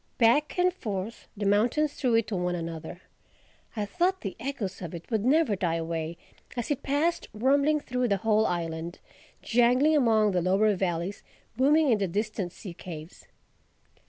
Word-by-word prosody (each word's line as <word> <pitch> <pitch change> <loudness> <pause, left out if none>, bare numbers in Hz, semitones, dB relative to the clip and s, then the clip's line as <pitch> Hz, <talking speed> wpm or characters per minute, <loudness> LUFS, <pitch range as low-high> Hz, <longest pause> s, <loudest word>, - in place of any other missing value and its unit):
Back 260 +8 +3
and 360 0 +3
forth 210 - -5
the 205 - -2
mountains 240 +9 +2
threw 250 -4 +1
it 230 -1 +3
to 215 - -4
one 180 -1 -1
another. 165 +1 -6 0.7
I 210 -2 -1
thought 360 - 0
the 195 - -5
echoes 235 -9 -4
of 175 -1 -6
it 170 - -8
would 220 -2 +1
never 275 -3 +3
die 175 -3 0
away 165 0 -3 0.4
as 240 +4 -2
it 285 - -1
passed 305 +5 0
rumbling 280 +6 +3
through 250 -3 -1
the 200 -3 +2
whole 215 +2 +2
island, 165 0 -3 0.5
jangling 250 +6 +4
among 220 -6 +4
the 180 -2 +1
lower 195 +4 +3
valleys, 180 +1 -2 0.3
booming 290 +3 +4
in 220 - +3
the 195 - 0
distant 205 0 -2
sea 185 -1 -9
caves. 165 -1 -10
215 Hz, 165 wpm, -28 LUFS, 180-260 Hz, 0.7 s, jangling